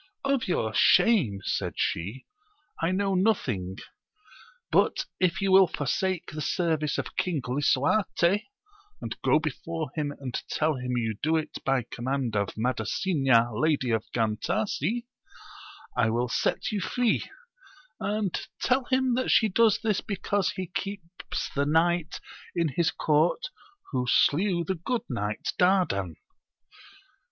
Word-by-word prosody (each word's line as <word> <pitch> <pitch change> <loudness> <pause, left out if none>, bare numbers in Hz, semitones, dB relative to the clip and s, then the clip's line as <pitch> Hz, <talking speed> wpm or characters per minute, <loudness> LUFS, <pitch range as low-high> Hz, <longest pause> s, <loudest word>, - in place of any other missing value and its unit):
Of 275 -3 +1
your 110 -11 0
shame, 125 - +4
said - - -2
she, 100 +10 -2 0.6
I 165 - +2
know 195 +1 0
nothing; 125 - 0 0.9
but - - +2
if 185 -1 +1
you 195 -1 +1
will 190 0 +7
forsake 175 +5 -2
the 155 0 -5
service 160 -3 0
of - - -4
King 175 -5 0
Lisuarte, 170 - +1 0.5
and - - -5
go - - +4
before 155 0 -4
him 150 -2 -2
and 130 -3 -6 0.2
tell 155 0 +1
him 125 0 -3
ypu 110 -3 -2
do 160 +2 +2
it 155 - -5
by 135 -2 +1
command 125 0 -3
of 100 -1 -1
Madasina, 125 - +1
Lady 140 0 +1
of 110 -1 +1
Gantasi, 195 - -1 0.9
I 115 -3 +2
will 120 +2 0
set - - 0
you 205 -2 -1
free; 240 +4 0 0.7
and 205 -3 -1 0.2
tell 255 0 +1
him 260 -1 +1
that 255 +2 0
she 220 - +4
does 220 +2 +3
this 215 -3 +1
because 200 -1 -1
he 185 - -4
keeps 190 -3 -5
the 140 0 0
knight 165 +1 +1 0.4
in 170 -2 +1
his 160 +4 +1
court 160 - +1 0.4
who 125 -3 -1
slew 170 +6 +3
the 190 - -1
good 245 +3 -1
knight 105 -2 -3
Dardan. 175 - +2
160 Hz, 135 wpm, -27 LUFS, 125-195 Hz, 0.9 s, will